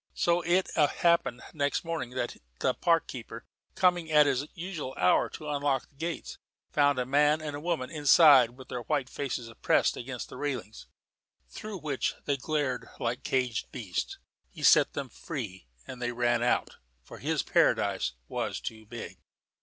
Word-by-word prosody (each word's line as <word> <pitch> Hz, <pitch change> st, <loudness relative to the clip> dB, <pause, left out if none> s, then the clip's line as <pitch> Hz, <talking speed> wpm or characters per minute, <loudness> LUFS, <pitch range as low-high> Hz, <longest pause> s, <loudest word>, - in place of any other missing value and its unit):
So 170 Hz, 0 st, +2 dB
it 175 Hz, +2 st, +1 dB
happened 155 Hz, -4 st, +2 dB
next 145 Hz, -2 st, 0 dB
morning 165 Hz, -7 st, -3 dB
that 120 Hz, -2 st, -3 dB, 0.2 s
the 130 Hz, -, +1 dB
park 165 Hz, 0 st, +2 dB
keeper, 125 Hz, -3 st, -8 dB, 0.3 s
coming 175 Hz, -3 st, +2 dB
at 150 Hz, -1 st, +7 dB
his 140 Hz, +1 st, 0 dB
usual 170 Hz, -7 st, -5 dB
hour 90 Hz, 0 st, +3 dB
to 155 Hz, -, -9 dB
unlock 140 Hz, -3 st, 0 dB
the -, -, -32 dB
gates, 165 Hz, +3 st, -5 dB, 0.3 s
found 145 Hz, -2 st, +3 dB
a 125 Hz, -, 0 dB
man 145 Hz, +3 st, +3 dB
and 150 Hz, -2 st, -5 dB
a -, -, -5 dB
woman 155 Hz, -5 st, -2 dB
inside 145 Hz, -5 st, +6 dB
with 130 Hz, -, -12 dB
their 125 Hz, -, -4 dB
white 135 Hz, 0 st, -1 dB
faces 120 Hz, -5 st, -4 dB
pressed -, -, +3 dB
against 125 Hz, 0 st, -6 dB
the -, -, -9 dB
railings, 125 Hz, -7 st, -4 dB, 0.6 s
through 215 Hz, -, -7 dB
which 150 Hz, -6 st, -2 dB
they 140 Hz, -, +1 dB
glared 145 Hz, -1 st, -2 dB
like 120 Hz, +1 st, -2 dB
caged 125 Hz, -3 st, -1 dB
beasts. 110 Hz, -, -4 dB, 0.3 s
He -, -, -10 dB
set -, -, +6 dB
them -, -, -4 dB
free, 110 Hz, -, -7 dB, 0.2 s
and 125 Hz, -1 st, -9 dB
they 120 Hz, 0 st, -1 dB
ran 120 Hz, 0 st, +1 dB
out, 120 Hz, -, 0 dB, 0.3 s
for -, -, -12 dB
his -, -, 0 dB
paradise 65 Hz, -, +2 dB
was -, -, -3 dB
too 110 Hz, -1 st, -7 dB
big. 120 Hz, +1 st, -8 dB
140 Hz, 165 wpm, -29 LUFS, 120-155 Hz, 0.6 s, at